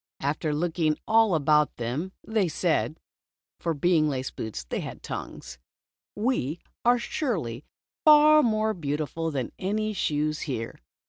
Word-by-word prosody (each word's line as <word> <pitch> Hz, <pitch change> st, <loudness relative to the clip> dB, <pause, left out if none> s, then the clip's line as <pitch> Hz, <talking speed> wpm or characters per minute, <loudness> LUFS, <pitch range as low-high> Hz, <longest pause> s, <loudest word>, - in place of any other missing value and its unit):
After 150 Hz, +2 st, -1 dB
looking 160 Hz, 0 st, 0 dB
all 220 Hz, -4 st, +4 dB
about 150 Hz, 0 st, +3 dB
them, 130 Hz, +11 st, -3 dB, 0.2 s
they 220 Hz, -4 st, +1 dB
said 160 Hz, -1 st, 0 dB, 0.6 s
(for 165 Hz, -2 st, -1 dB
being 155 Hz, 0 st, +3 dB
laced 130 Hz, -2 st, -3 dB
boots, 110 Hz, -, -5 dB
they -, -, -4 dB
had -, -, -7 dB
tongues): 65 Hz, -, -7 dB, 0.6 s
"We 205 Hz, -, -1 dB, 0.2 s
are 245 Hz, +1 st, +5 dB
surely 175 Hz, -, -3 dB, 0.4 s
far 305 Hz, 0 st, +8 dB
more 220 Hz, -3 st, +1 dB
beautiful 155 Hz, -1 st, -3 dB
than 135 Hz, -6 st, -3 dB
any 215 Hz, +3 st, -1 dB
shoes 155 Hz, -4 st, 0 dB
here." 115 Hz, -3 st, -4 dB
160 Hz, 130 wpm, -26 LUFS, 145-215 Hz, 0.6 s, far